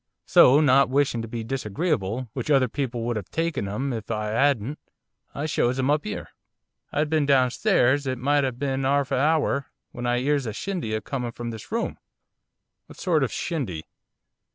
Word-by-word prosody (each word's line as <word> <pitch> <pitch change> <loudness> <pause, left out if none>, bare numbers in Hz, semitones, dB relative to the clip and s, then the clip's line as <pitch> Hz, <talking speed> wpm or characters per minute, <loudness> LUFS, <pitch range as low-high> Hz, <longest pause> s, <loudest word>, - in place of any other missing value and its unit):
So, 135 +4 +7
not 135 -3 +5
wishing 135 -3 +1
to 115 - -6
be 115 0 -5
disagreeable 125 - -2
which 125 +1 -4
other 135 -3 +4
people 125 -2 -3
would 120 -1 -1
have 100 - -6
taken 165 -10 -1
'em 130 +7 -2
if 110 -2 -6
I 105 -1 -2
'adn't, 135 +1 +1 0.6
I 145 - -3
shows 130 -5 +1
'em 130 +2 +1
up 150 -3 0
'ere. - - -5 0.6
I'd 150 +1 0
been 155 -2 +1
downstairs 135 - +3
it 130 0 -1
might 145 +3 +2
'ave 130 -3 -2
been 135 0 -1
'arf 140 0 +1
a - - +2
hour, 145 -2 +1 0.2
when 120 0 -5
I 120 0 +2
'ears 140 0 0
a 110 - -3
shindy 170 - -3
a 110 - -2
coming 125 -3 -4
from 120 -1 -5
this 110 - -10
room 230 +1 -2 0.4
' - - -57
'What - - -14
sort 170 -5 +2
of 130 - 0
a - - -10
shindy? 120 - -3
130 Hz, 195 wpm, -25 LUFS, 120-145 Hz, 0.6 s, So